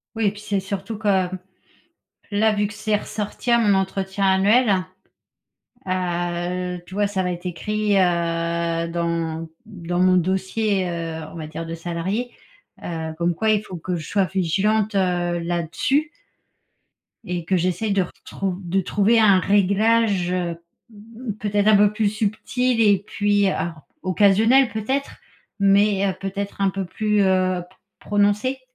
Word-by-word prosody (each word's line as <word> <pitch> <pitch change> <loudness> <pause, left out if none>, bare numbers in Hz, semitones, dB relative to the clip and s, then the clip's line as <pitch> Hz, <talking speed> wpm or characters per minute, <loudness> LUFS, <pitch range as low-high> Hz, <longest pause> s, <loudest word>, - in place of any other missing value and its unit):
Oui 225 -1 0
et - - +2
puis 205 0 -12
c'est 200 -2 -1
surtout 195 +3 -5
que, 195 -4 +1 1.0
là, 215 +1 +2
vu 205 0 +1
que 205 - -10
c'est 215 0 -1
ressorti 210 +3 -4
à 235 - +6
mon 210 -4 +3
entretien 190 +1 -1
annuel, 195 0 +3 1.0
heu, 180 0 -2
tu 185 - -13
vois, 205 +1 +1
ça 190 -2 -2
va 180 - -1
être 175 +1 -9
écrit, 205 +4 0
heu, 170 -1 0
dans 165 -1 -2 0.2
dans 180 -4 -4
mon 185 0 +4
dossier, 190 +2 0
heu, 165 -2 -4
on - - -10
va 155 -2 -6
dire 160 +2 -6
de 165 0 -5
salariée, 175 +8 -3 0.5
heu, 160 -2 -4
comme 170 0 0
quoi 220 +3 0
il 215 -1 +3
faut 185 - -9
que 175 +2 -3
je 155 - -7
sois 200 -2 +1
vigilante, 200 +4 0
heu, 175 -2 +1
là-dessus 175 - -1 1.1
et 175 -1 -4
que 190 - +1
j'essaie 185 +4 0
de 195 -1 +2
retrouv 185 +1 -5
de 185 +2 0
trouver 205 +5 +2
un 200 -4 +6
réglage, 200 -1 +2
heu, 175 -2 -2 0.3
mmh, 225 +2 -8
peut-être 205 0 0
un 215 - +7
peu 205 0 +4
plus 210 -1 +1
subtil 230 +3 0
et 205 -3 +4
puis, 205 -1 +1
ar 170 -4 -3 0.2
occasionnel 215 +8 +4
peut-être? 260 +6 -3 0.4
Mais, 200 0 +3
heu, 190 - 0
peut-être 200 +1 -4
un 195 - +3
peu 190 0 -3
plus, 210 +3 0
heu, 185 -2 +2
pr - - -24 0.2
prononcé? 210 +6 +1
195 Hz, 155 wpm, -22 LUFS, 175-210 Hz, 1.1 s, un